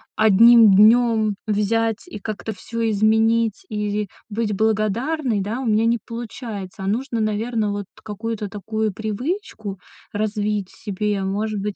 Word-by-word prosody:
одним 220 Hz, 0 st, +7 dB
днём 220 Hz, 0 st, +5 dB
взять 225 Hz, -, 0 dB
и 210 Hz, -, -8 dB
как-то 215 Hz, +1 st, -5 dB
всё 230 Hz, +3 st, -3 dB
изменить, 220 Hz, +1 st, +2 dB
и 210 Hz, -1 st, -2 dB, 0.2 s
быть 215 Hz, 0 st, -1 dB
благодарной, 220 Hz, +4 st, 0 dB
да, 215 Hz, +6 st, -3 dB
у -, -, -4 dB
меня 220 Hz, 0 st, +2 dB
не 235 Hz, +1 st, +3 dB
получается. 225 Hz, -5 st, -7 dB
А -, -, -3 dB
нужно, 235 Hz, +2 st, -1 dB
наверно, 215 Hz, 0 st, -1 dB
вот 205 Hz, -1 st, -4 dB, 0.2 s
какую-то 215 Hz, -1 st, -4 dB
такую 215 Hz, +1 st, -3 dB
привычку 220 Hz, -, -4 dB, 0.3 s
развить 210 Hz, -2 st, -2 dB
в -, -, -19 dB
себе. 205 Hz, -1 st, -1 dB
Может 205 Hz, +2 st, -2 dB
быть, 210 Hz, -1 st, -3 dB
215 Hz, 140 wpm, -22 LUFS, 205-230 Hz, 0.3 s, одним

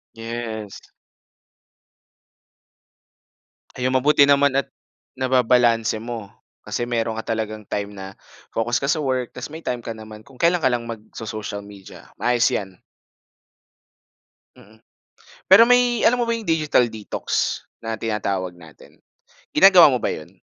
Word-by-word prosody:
Yes. 115 Hz, -2 st, -6 dB, 3.0 s
Ayun, 130 Hz, 0 st, -1 dB
mabuti 140 Hz, +3 st, +4 dB
naman 140 Hz, -1 st, +4 dB
at 140 Hz, -, -1 dB, 0.5 s
nababalanse 125 Hz, -3 st, +2 dB
mo. 115 Hz, -3 st, -7 dB, 0.3 s
Kasi 120 Hz, -, -3 dB
meron 115 Hz, -2 st, -1 dB
ka -, -, -29 dB
talagang 110 Hz, -1 st, -4 dB
time 100 Hz, 0 st, -3 dB
na 95 Hz, 0 st, -9 dB, 0.3 s
focus 120 Hz, +3 st, -1 dB
ka 140 Hz, -, -1 dB
sa 160 Hz, -, +2 dB
work 130 Hz, -3 st, -1 dB
tapos -, -, -7 dB
may 160 Hz, -, -8 dB
time 120 Hz, -5 st, -4 dB
ka 115 Hz, -, -4 dB
naman 110 Hz, -1 st, -12 dB
kung 135 Hz, -2 st, -18 dB
kailan 170 Hz, +1 st, +4 dB
ka 130 Hz, -, +3 dB
lang 120 Hz, -1 st, -3 dB
magso-social 110 Hz, -2 st, -7 dB
media, 100 Hz, -1 st, -14 dB
maayos 120 Hz, -1 st, +2 dB
'yan. 95 Hz, -2 st, -4 dB, 1.8 s
Mm. 110 Hz, +2 st, -19 dB, 0.7 s
Pero 205 Hz, +5 st, +9 dB
may 245 Hz, -1 st, +3 dB
alam 245 Hz, +1 st, +3 dB
mo 235 Hz, -, -1 dB
ba 230 Hz, -, +1 dB
'yong 225 Hz, -, -8 dB
digital 155 Hz, -6 st, +2 dB
detox 110 Hz, -2 st, -2 dB, 0.2 s
na 115 Hz, 0 st, -4 dB
tinatawag 100 Hz, -4 st, -2 dB
natin, 80 Hz, -5 st, -17 dB, 0.5 s
ginagawa 180 Hz, -7 st, +7 dB
mo 125 Hz, -, -1 dB
ba -, -, 0 dB
'yon? 75 Hz, -, -8 dB
115 Hz, 135 wpm, -22 LUFS, 110-140 Hz, 3.0 s, Pero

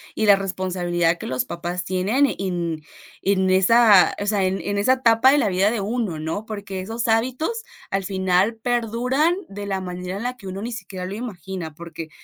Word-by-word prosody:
y 220 Hz, -, 0 dB
la 200 Hz, -, +8 dB
responsabilidad 180 Hz, -3 st, 0 dB
que -, -, -7 dB
los 130 Hz, 0 st, -1 dB
papás 175 Hz, +1 st, -4 dB
tienen 195 Hz, +10 st, +2 dB
en 175 Hz, -4 st, -2 dB, 0.4 s
en 190 Hz, -1 st, +2 dB
esa, 200 Hz, +1 st, +6 dB
o -, -, -1 dB
sea, 205 Hz, -2 st, +2 dB
en 185 Hz, +1 st, 0 dB
en 200 Hz, 0 st, -2 dB
esa 255 Hz, +6 st, +4 dB
etapa 255 Hz, 0 st, +5 dB
de 290 Hz, -, +4 dB
la 210 Hz, -, +2 dB
vida 190 Hz, +3 st, +2 dB
de 225 Hz, -4 st, -2 dB
uno, 210 Hz, -6 st, -2 dB
¿no? 165 Hz, +8 st, -3 dB
Porque 200 Hz, -3 st, -5 dB
esos 225 Hz, +4 st, -3 dB
hábitos 260 Hz, -, 0 dB, 0.3 s
al 195 Hz, 0 st, -1 dB
final 190 Hz, +3 st, +1 dB
perduran 245 Hz, +7 st, +1 dB
de 205 Hz, +1 st, -6 dB
la 195 Hz, -1 st, -2 dB
manera 180 Hz, +1 st, -5 dB
en 220 Hz, -, -5 dB
la 250 Hz, +1 st, -3 dB
que 200 Hz, -, -14 dB
uno 190 Hz, +2 st, -5 dB
ni 235 Hz, +2 st, -4 dB
siquiera 190 Hz, -4 st, -6 dB
lo 195 Hz, +2 st, -5 dB
imagina, 190 Hz, -7 st, -6 dB
porque 165 Hz, 0 st, -8 dB
195 Hz, 195 wpm, -22 LUFS, 180-225 Hz, 0.4 s, la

